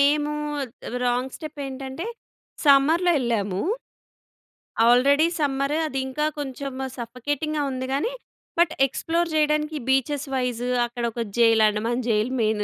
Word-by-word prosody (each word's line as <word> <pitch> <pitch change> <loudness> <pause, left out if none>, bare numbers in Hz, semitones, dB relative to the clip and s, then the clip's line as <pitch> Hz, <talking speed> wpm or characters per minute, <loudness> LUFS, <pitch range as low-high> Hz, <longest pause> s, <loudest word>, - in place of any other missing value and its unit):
మేము 295 +1 +3 0.7
wrong 250 +2 0
step 305 -2 -8
ఏంటంటే, 270 +7 -6 0.6
సమ్మర్‌లో 315 +6 +5
ఎళ్ళాము. 205 -6 -1 1.3
ఆల్రెడీ 280 +6 +5
సమ్మర్ 275 0 0
అది. 270 -3 -2
ఇంకా 300 +3 -1
కొంచెము 265 -1 -4
సఫోకేటింగ్‌గా 290 +6 -2
ఉంది 260 0 -3
గాని, 380 - 0 0.5
బట్ 340 -2 +4
ఎక్స్‌ప్లోర్ 335 +5 -1
చేయడానికి 300 0 +1
బీచెస్ 275 +2 +1
వైస్ 245 -2 -1 0.2
అక్కడ 240 0 -6
ఒక 235 - -2 0.2
జైల్, 225 -1 +5
అండమాన్ 230 +4 -2
జైల్ 215 +3 +1
మెయిన్. 215 -1 +1
270 Hz, 120 wpm, -24 LUFS, 245-300 Hz, 1.3 s, సమ్మర్‌లో